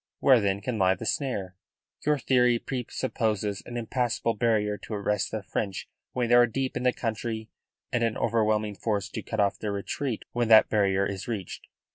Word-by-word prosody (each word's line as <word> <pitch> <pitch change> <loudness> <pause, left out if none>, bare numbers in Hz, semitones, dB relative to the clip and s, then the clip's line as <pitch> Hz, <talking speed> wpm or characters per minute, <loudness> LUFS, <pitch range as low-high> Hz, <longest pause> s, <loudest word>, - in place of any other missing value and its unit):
Where, 130 -4 +5
then, 100 0 0
can 110 +1 -3
lie 95 0 +4
the 105 - -7
snare? 100 -9 -2 0.5
Your 150 0 +4
theory 125 -2 +3
presupposes 115 -5 -2
an 120 - -5
impassable 120 0 0
barrier 105 -2 +1
to 110 - -6
arrest 105 0 0
the 110 -2 -4
French 95 +1 -3 0.3
when 125 -1 0
they - - +4
are 120 0 +7
deep 130 +3 -2
in - - -2
the 125 0 +3
country 110 -1 -4 0.4
and 120 - +1
an 115 -1 0
overwhelming 110 -2 +1
force 100 -1 -2
to - - -5
cut 110 - -5
off 100 -1 +2
their 105 -2 -2
retreat 115 +5 -3
when 120 -1 0
that 110 -1 +7
barrier 100 -2 +2
is 100 -1 -4
reached. 105 -6 -5
110 Hz, 185 wpm, -27 LUFS, 100-120 Hz, 0.5 s, are